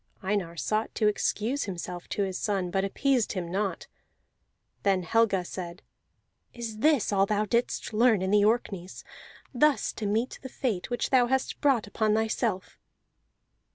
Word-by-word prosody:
Einar 190 -4 -1
sought 215 +6 -1
to 215 - +1
excuse 220 +5 0
himself 180 -2 -6
to 205 - 0
his 190 -1 -3
son, 195 -4 -1
but 195 +1 +1
appeased 250 +4 +1
him 175 -3 -4
not. 195 0 -2 1.0
Then 195 -2 +2
Helga 200 -1 +2
said: 175 0 -7 0.7
"Is 225 -3 -6
this 290 -6 +3
all 195 0 +3
thou 210 0 +1
didst 235 +1 -1
learn 220 -3 +4
in 190 - -1
the 205 0 +5
Orkneys, 205 -5 -1 0.5
thus 295 +3 +2
to 210 - -4
meet 225 +5 -1
the 260 - -7
fate 225 -10 -2
which 240 -1 -2
thou 250 -2 +5
hast 265 +1 -1
brought 270 -7 +3
upon 215 +1 +1
thyself?" 220 -4 -1
210 Hz, 155 wpm, -28 LUFS, 190-235 Hz, 1.0 s, the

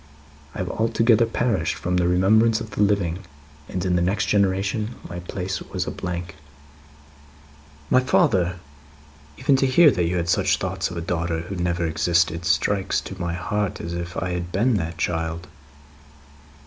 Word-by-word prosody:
I - - -6
have 90 -1 -3
altogether 115 0 +3
perished 115 -8 0
from 90 0 -1
the 90 -1 +2
remembrance 110 +6 +4
of 110 -1 -7
the 100 - -2
living, 100 -4 +1 0.5
and 90 0 -3
in 90 -1 +1
the 90 - +2
next 100 +4 +1
generation 100 +3 0
my 85 - -6
place 90 +1 -4
was - - -4
a - - -4
blank." 85 -2 -5 1.5
"My 130 - +6
father! 95 -8 +2 0.8
Even 140 - +3
to 135 - +2
hear 150 +4 +6
that 90 -6 0
you 90 +1 -1
had 85 -1 -1
such - - +2
thoughts 95 0 -2
of 85 - -7
a - - -3
daughter 85 -1 -2
who 95 +4 -6
never 85 -1 -1
existed, 85 +1 +1
strikes 100 +1 +1
to 95 -1 -8
my 85 -1 -2
heart 105 +2 -2
as 85 - -5
if 85 0 -5
I 90 +1 -2
had 90 0 -4
been 115 +8 +2
that 80 -2 -4
child." 80 0 -2
90 Hz, 170 wpm, -23 LUFS, 85-105 Hz, 1.5 s, My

